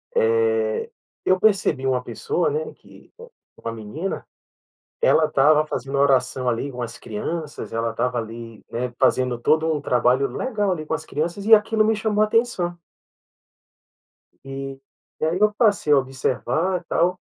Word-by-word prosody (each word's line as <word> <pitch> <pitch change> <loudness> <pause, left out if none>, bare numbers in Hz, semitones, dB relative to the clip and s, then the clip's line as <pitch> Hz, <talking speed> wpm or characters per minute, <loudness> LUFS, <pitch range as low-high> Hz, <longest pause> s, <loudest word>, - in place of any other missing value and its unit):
Eh, 455 0 +1 0.4
eu 185 0 +3
percebi 195 -11 +2
uma 125 -1 +1
pessoa, 455 - -1
né, 460 +1 -3
que - - -19 0.5
uma 115 - -5
menina, 115 - -5 0.8
ela 160 - +4
estava 150 +2 +4
fazendo 135 -1 -4
oração 130 -2 +2
ali 130 +4 -2
com 125 0 -7
as 120 0 -5
crianças, 150 +9 -5
ela 115 0 -1
estava 125 +1 -1
ali, 115 0 -7
né, 120 +1 -3
fazendo 125 -2 +2
todo 160 +6 +2
o 150 -2 -1
trabalho 125 +1 +2
legal, 210 - -1
ali, 155 -3 -3
com 155 - -3
as 160 - -3
crianças 170 +6 -3
e 225 - +6
aquilo 215 +1 +2
me 220 0 +2
chamou 215 0 +1
atenção. 210 -6 0 1.7
E 135 0 -6 0.4
e - - 0
aí 170 +4 0
eu 210 0 +4
passei 205 -10 +3
a 145 - +7
observar 135 - -1
e - - -24
tal, 180 +2 +1
155 Hz, 150 wpm, -23 LUFS, 125-210 Hz, 1.7 s, a